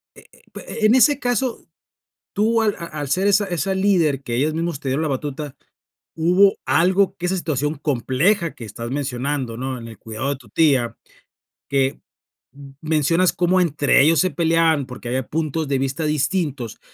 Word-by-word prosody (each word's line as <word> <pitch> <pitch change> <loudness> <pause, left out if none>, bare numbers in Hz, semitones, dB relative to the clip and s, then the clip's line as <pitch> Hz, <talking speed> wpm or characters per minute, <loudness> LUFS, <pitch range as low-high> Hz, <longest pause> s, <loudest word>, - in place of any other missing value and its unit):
Eh - - -15
eh - - -21
eh, - - -8
en 220 +3 +5
ese 285 +2 +5
caso, 245 -1 -1 0.7
tú 225 +2 +2
al 210 -2 +1
a 170 - -6
al 150 -4 -6
ser 185 +8 +1
esa 205 +1 +3
esa 180 0 -2
líder 180 -8 +2
que 120 -2 -3
ellos 150 +5 +1
mismos 165 -2 -2
te 140 - -4
dieron 135 +4 0
la - - 0
batuta, 145 0 -4 0.6
hubo 180 +5 +4
algo 185 +4 +2
que 180 - -4
esa 190 +1 0
situación 150 -3 -1
compleja 150 - 0
que 120 - -9
estás 115 +2 -7
mencionando, 135 -2 -3
¿no?, 130 +1 -4
en 115 - -9
el 115 - -11
cuidado 115 +5 -4
de 140 - -1
tu - - -19
tía, 135 -7 +2 0.7
que 135 -1 0 0.5
m 140 -1 -13
mencionas 160 +3 +2
cómo 180 +1 +2
entre 145 -5 +3
ellos 160 +3 +4
se 185 - +2
peleaban, 165 -2 +2
porque 125 -2 -8
había 130 +1 -2
puntos 155 0 -2
de 140 -1 0
vista 135 +4 -2
distintos, 145 - -1
155 Hz, 180 wpm, -21 LUFS, 135-180 Hz, 0.7 s, en